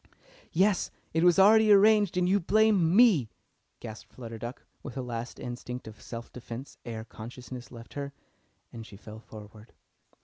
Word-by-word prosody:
"Yes, 190 +2 +2 0.2
it 165 +1 +2
was 175 -1 +5
already 215 +2 +6
arranged, 205 -2 +5
and 180 0 +2
you 195 +2 +3
blamed 215 +2 +3
me!" 170 - +5 0.5
gasped 110 -2 -9
Flutter 115 -3 -8
Duck, 120 +3 -7 0.2
with - - -8
a 130 - -2
last 120 0 -5
instinct 125 -1 -6
of 110 -1 -11
self 115 -1 -8
defence 125 +2 -9
ere 110 -1 -6
consciousness 125 +2 -9
left 115 -1 -11
her, 140 -1 -5 0.6
and 115 - -7
she 105 -3 -13
fell 110 +1 -11
forward. 105 0 -13
125 Hz, 160 wpm, -29 LUFS, 115-185 Hz, 0.6 s, already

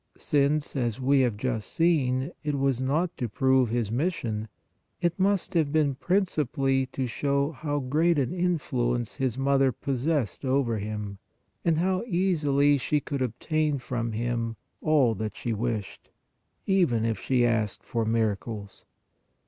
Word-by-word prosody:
Since, 145 +1 +1
as 120 -3 -1
we 135 +2 +3
have 120 -5 +2
just 115 -2 -3
seen, 140 -4 +1
it 145 -1 -1
was 135 -2 +1
not 155 +7 0
to 120 - -2
prove 130 +2 +3
His 115 -2 -1
mis 160 +10 0
sion, 110 -1 -4 0.5
it 175 +1 0
must 195 0 +1
have 160 -5 +2
been 150 -3 +2
principally 135 -4 0
to 130 0 -3
show 140 +4 0
how 145 0 -3
great 155 +6 +2
an 140 +3 0
influence 130 - -1
His 130 -3 -1
Mother 135 0 +3
possessed 135 0 -1
over 130 -4 +1
Him, 105 -1 -5 0.4
and 165 -2 +2
how 185 +2 +1
easily 150 - +2
she 150 +3 +1
could 140 -1 -4
obtain 150 +5 0
from 120 -2 -3
Him 115 0 -2 0.3
all 145 -7 +3
that 110 0 -4
she 120 - -2
wished, 110 -2 -4 0.6
even 170 - +2
if 115 -1 -1
she 125 -2 +2
asked 110 -3 0
for 115 -3 -1
miracles. 110 -2 -2
130 Hz, 150 wpm, -27 LUFS, 115-150 Hz, 0.6 s, we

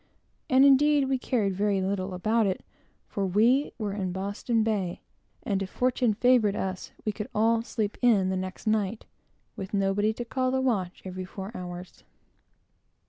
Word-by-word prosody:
And, 265 +1 +6
indeed, 280 0 +5
we 265 -1 0
cared 215 -7 0
very 200 +1 +1
little 190 0 -2
about 215 +4 +2
it, 190 - -3 0.4
for 200 - -3
we 225 +9 +3
were 210 -3 -3
in 190 -3 -2
Boston 200 +5 -1
Bay; 200 -5 -1 0.4
and 200 -5 -1
if 195 - -3
fortune 250 -2 +1
favored 230 -3 +3
us, 190 -3 -4
we 215 - +1
could 210 0 -6
all 225 +2 +3
"sleep 220 -3 -3
in" 210 -7 +4
the 190 - 0
next 185 0 -5
night, 215 0 0 0.5
with 195 +1 -5
nobody 200 +2 +2
to 240 +2 -5
call 255 +2 -1
the 260 +1 +1
watch 205 -9 -1
every 185 0 -5
four 190 +2 -7
hours. 180 0 -8
210 Hz, 165 wpm, -27 LUFS, 190-235 Hz, 0.5 s, And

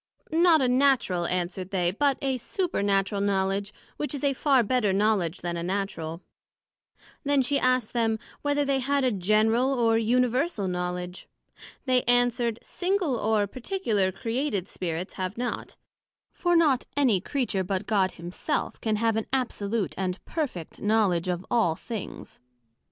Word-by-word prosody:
Not 330 -3 +5
a - - +3
Natural, 250 -9 +2
answered 180 +1 -2
they, 180 -3 +1
but 275 +7 +1
a 265 -2 0
Supernatural 200 - 0
Knowledg, 195 0 0 0.3
which 295 0 -2
is 280 - -6
a 280 -1 +3
far 270 -2 +3
better 225 -2 +1
Knowledg 195 -4 +1
then 175 -1 -3
a - - -3
Natural. 175 -3 -3 1.0
Then 285 -2 +3
she 280 +2 +1
asked 255 -3 +1
them, 225 -2 +1 0.2
Whether 290 0 +1
they 275 -1 +1
had 280 +2 +1
a 255 - +3
General 215 +6 +2
or 230 -3 +3
Universal 245 - +1
Knowledg? 180 0 -4 0.6
They 255 -2 +3
answered, 245 -2 +2
Single 360 -6 0
or 215 -2 +1
particular 225 - -1
created 225 0 -2
Spirits, 175 0 -4
have 185 +2 -4
not; 245 0 -4 0.6
for 350 -1 +1
not 295 -7 +4
any 240 -10 +3
Creature, 220 -6 -1
but 190 0 -2
God 195 -4 +1
Himself, 175 +1 -3
can 220 -2 0
have 225 +1 +1
an 220 - -2
absolute 230 -6 -1
and 185 -1 -1
perfect 265 - -4
knowledg 205 -5 +2
of 180 +1 -4
all 220 -9 +3
things. 220 +3 -7
220 Hz, 145 wpm, -27 LUFS, 190-260 Hz, 1.0 s, Not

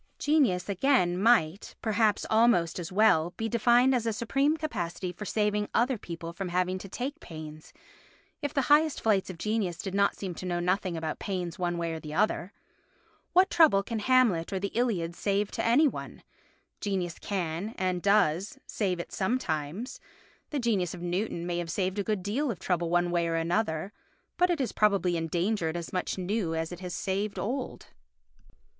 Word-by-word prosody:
Genius, 270 -13 +2
again, 200 -3 +2
might, 200 -3 +2
perhaps 215 -1 +1
almost 220 -7 +3
as 170 0 -6
well, 180 -4 +3
be 225 - -1
defined 240 +3 +4
as 235 -3 0
a - - +2
supreme 275 +7 +1
capacity 180 - -3
for 195 +4 -8
saving 210 0 0
other 250 +3 +3
people 170 -5 -7
from 185 +1 -4
having 180 +1 0
to 195 - -9
take 275 - -4
pains, 155 - -10 0.7
if 290 -2 -2
the 275 -3 +1
highest 300 +2 +4
flights 205 -4 +1
of 185 - -7
genius 210 -3 -1
did 190 +1 -5
not 200 0 +2
seem 190 -3 -5
to 185 - -8
know 175 -1 -1
nothing 180 0 0
about 160 -1 -4
pains 180 -4 -4
one 175 -1 -1
way 170 -1 -2
or 160 - -4
the 155 -1 -7
other. 200 -1 +1 0.8
What 370 +1 +5
trouble 310 - +5
can 225 +2 -3
Hamlet 220 -8 +3
or 190 - -1
the 200 +1 -2
Iliad 195 -8 0
save 200 +1 0
to - - -3
any 260 +7 +5
one? - - -6 0.6
Genius 185 -5 -2
can, 185 +2 -3
and 185 -1 -1
does, 200 - +2
save 185 -5 -1
it 170 - -6
sometimes; 190 - -2 0.5
the 295 - -2
genius 205 - 0
of 175 - -9
Newton 175 -1 -2
may 175 0 -2
have 170 -1 -4
saved 190 +3 -1
a - - +1
good 210 -2 -1
deal 255 +9 -1
of 220 - -2
trouble 175 -2 -1
one 175 0 +2
way 170 -1 +1
or 165 - -1
another, 165 +2 -1 0.4
but 360 0 +3
it 350 - +1
has 265 -4 -1
probably 200 -4 +2
engendered 170 +1 -1
as 170 - -6
much 180 +1 -2
new 185 -2 -1
as 160 +1 -2
it 175 - -7
has 180 -1 -5
saved 200 +1 -2
old. 255 +4 -3
195 Hz, 185 wpm, -28 LUFS, 175-225 Hz, 0.8 s, What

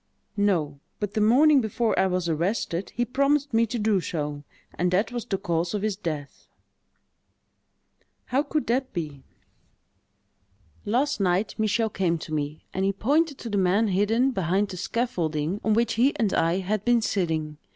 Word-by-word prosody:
"No—but 190 0 -1
the 215 - 0
morning 270 +6 +5
before 225 +1 0
I 190 - +4
was 180 -2 -1
arrested, 170 +2 -1
he 240 - +1
promised 280 +2 +1
me 230 +1 +3
to 240 - -3
do 210 -3 +2
so; 150 -4 -4 0.3
and 180 +2 0
that 190 +7 +1
was 240 -2 -4
the 195 - -1
cause 170 -1 -1
of 205 - -2
his 215 -2 0
death." 155 -7 -6 1.8
"How 265 +3 +1
could 300 0 -2
that 255 +2 -1
be?" 150 -6 -5 1.6
"Last 260 +6 +1
night, 190 +2 +1
Michel 220 +1 +1
came 175 -4 0
to 155 - -8
me, 150 0 -3
and 190 - -1
he 195 - +2
pointed 290 - +1
to 235 - -7
the 200 - +1
man 195 +4 +2
hidden 220 +7 +2
behind 195 -1 0
the 185 - -7
scaffolding 175 -5 -2
on 215 -1 +2
which 230 0 +2
he 255 +6 +2
and 215 -4 +1
I 165 +2 +2
had 205 +2 -2
been 240 -1 +3
sitting. 160 -7 -1
205 Hz, 165 wpm, -25 LUFS, 170-235 Hz, 1.8 s, morning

